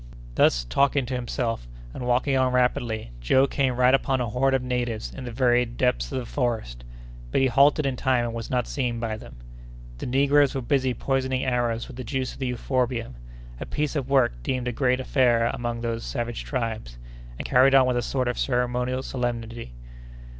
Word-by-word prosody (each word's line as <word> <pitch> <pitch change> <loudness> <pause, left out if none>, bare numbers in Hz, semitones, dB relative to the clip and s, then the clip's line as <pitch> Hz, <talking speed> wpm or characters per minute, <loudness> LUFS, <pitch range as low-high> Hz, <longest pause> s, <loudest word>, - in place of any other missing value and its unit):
Thus - - +3
talking 140 - +1
to 130 - -5
himself 120 - -2 0.3
and 125 - -5
walking 130 +3 +2
on 130 -1 +2
rapidly, 120 - 0
Joe 130 - +4
came 135 -2 0
right 125 +1 +4
upon 135 -1 +2
a 120 -2 -1
horde 135 +4 +2
of 130 - -1
natives 120 -3 -2
in 130 - -7
the 120 - -5
very 120 0 +3
depths 125 +1 -1
of 135 - -2
the 125 - -3
forest, 110 - -2 0.5
but - - +1
he 135 - +4
halted 140 +4 +4
in 135 -2 -1
time 125 -2 +1
and 115 - -4
was 115 -1 -5
not 125 -2 0
seen 125 -4 -2
by 115 -2 -2
them. 65 - -11 0.6
The - - -4
negroes 140 +2 +3
were 135 - -1
busy 130 -1 +1
poisoning 130 +1 -1
arrows 120 -2 0
with - - -11
the 130 - -5
juice 130 +1 -3
of - - -14
the 130 -2 -1
euphorbium—a 65 - -4
piece 150 +1 -2
of 135 -3 -2
work 125 - +2
deemed 125 - -2
a - - 0
great 125 +1 +1
affair 120 -3 +2
among 120 -1 -3
these 115 -1 -2
savage 120 -3 -4
tribes, 110 - -4 0.4
and - - -6
carried 135 +2 +5
on 135 -1 +7
with 125 -1 +1
a - - +1
sort 130 +1 -1
of 120 - -2
ceremonial 125 0 0
solemnity. 115 - -4
125 Hz, 195 wpm, -25 LUFS, 115-130 Hz, 0.6 s, on